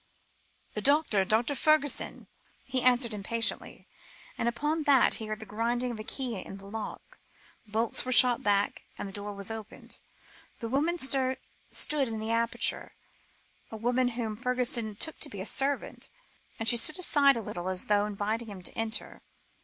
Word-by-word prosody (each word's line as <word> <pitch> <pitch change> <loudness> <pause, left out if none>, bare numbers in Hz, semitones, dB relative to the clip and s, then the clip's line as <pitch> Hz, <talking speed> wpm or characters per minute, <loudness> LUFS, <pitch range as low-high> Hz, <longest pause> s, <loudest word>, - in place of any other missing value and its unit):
"The - - -3
doctor 280 -9 +3
Dr. 225 +8 +1
Fergusson," 295 +1 +1 0.4
he 255 - -1
answered 245 -2 +3
impatiently; 225 +3 -3 0.5
and 235 - 0
upon 300 +6 -1
that, 275 -3 +5
he 220 - -6
heard 215 0 -4
the 220 - -8
grinding 235 +4 -1
of 225 - -7
a - - -5
key 245 -2 -4
in 195 - -9
the 195 - -13
lock, 215 +2 -7 0.5
bolts 220 +2 +3
were 255 - -3
shot 245 -1 +6
back, 205 0 +1 0.2
and - - -4
the 195 - -8
door 205 +1 -5
was 200 0 -6
opened. 220 -1 -8 0.6
A 230 - -4
woman 295 +8 +1
stood 265 -3 +2 0.7
in 225 -1 -4
the 220 +1 -3
aperture, 230 0 +1 0.7
a 220 - -7
woman 245 +3 +1
whom 220 -3 -2
Fergusson 245 -3 -1
took 315 +9 -3
to 295 - -2
be 200 - -8
a 190 - -4
servant, 275 +3 -1 0.5
and 225 - -2
she 240 - +7
stood 310 +9 +3
aside, 285 -7 +4
a - - -2
little, 180 -1 -4
as 185 -1 -3
though 205 0 +2
inviting 210 +3 -2
him 190 -3 -9
to - - -4
enter. 220 -1 -3
230 Hz, 170 wpm, -29 LUFS, 210-255 Hz, 0.7 s, she